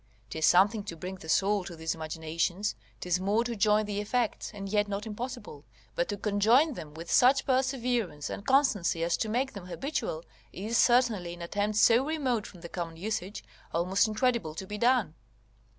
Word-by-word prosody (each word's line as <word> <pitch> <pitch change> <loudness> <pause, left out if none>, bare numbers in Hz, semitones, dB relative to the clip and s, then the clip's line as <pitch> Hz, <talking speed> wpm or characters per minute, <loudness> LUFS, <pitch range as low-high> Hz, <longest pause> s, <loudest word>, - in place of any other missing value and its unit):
'Tis 160 +2 +1
something 200 +4 +4
to 185 -4 -6
bring 180 +4 -6
the 160 -3 -11
soul 200 +4 +2
to 175 - -8
these 160 0 -2
imaginations; 165 +5 -2 0.3
'tis 180 0 0
more 205 +5 +1
to 240 -1 -4
join 210 0 +3
the 205 0 -3
effects, 230 +2 -1
and 200 -3 -7
yet 205 +1 +1
not 205 +1 -4
impossible; 220 - -7 0.3
but 175 - 0
to 205 - -2
conjoin 220 +10 +3
them 150 -9 -9
with 165 +1 -7
such 265 +2 +5
perseverance 245 - 0
and - - -6
constancy 225 - +2
as 170 0 +1
to 220 - -2
make 255 +4 -1
them 195 -3 -9
habitual, 185 - -3 0.3
is 215 +5 -4
certainly, 230 -8 +3
in 175 - -11
attempts 205 +4 0
so 235 +3 +6
remote 270 -8 -1
from 180 - -14
the 170 - -7
common 165 -2 -5
usage, 200 +1 -4 0.3
almost 180 +5 +2
incredible 215 -7 0
to 190 - -5
be 210 +2 -6
done. 240 -8 +2
205 Hz, 185 wpm, -29 LUFS, 175-235 Hz, 0.3 s, so